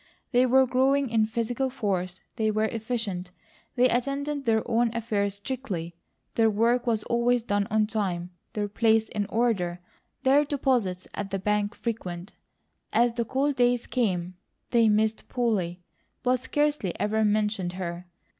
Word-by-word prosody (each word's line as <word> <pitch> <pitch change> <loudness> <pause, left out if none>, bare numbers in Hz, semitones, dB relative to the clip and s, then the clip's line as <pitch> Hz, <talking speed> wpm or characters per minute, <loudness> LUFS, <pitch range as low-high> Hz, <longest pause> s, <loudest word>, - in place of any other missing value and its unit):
They 250 0 +4
were 265 +1 +5
growing 265 +1 +2
in 220 -1 +3
physical 235 +3 -1
force, 190 -7 -2
they 220 -2 +1
were 215 0 +1
efficient, 220 -5 -3 0.5
they 250 0 +5
attended 280 +3 -1
their 220 -1 +2
own 235 +1 +2
affairs 205 -3 -1
strictly. 200 -7 -5 0.4
Their 225 -1 +4
work 235 +4 +2
was 220 -2 +1
always 235 0 +1
done 205 -2 0
on 215 0 +3
time, 190 -5 -2 0.2
their 205 -1 -1
place 220 +1 +2
in 205 -2 -2
order, 210 -7 0 0.4
their 275 +3 +5
deposits 250 -10 0
at 205 -1 -4
the 195 - -1
bank 210 +2 0
frequent. 185 -6 -5 0.6
As 235 +1 +3
the 235 -1 -1
cold 275 +4 0
days 245 -1 +2
came 185 -8 -1 0.4
they 230 -2 +5
missed 215 +1 +1
Polly, 190 -8 -1 0.4
but 250 0 +2
scarcely 290 -6 -1
ever 220 +1 +1
mentioned 210 -3 +1
her. 175 -1 -5
220 Hz, 145 wpm, -27 LUFS, 200-245 Hz, 0.6 s, were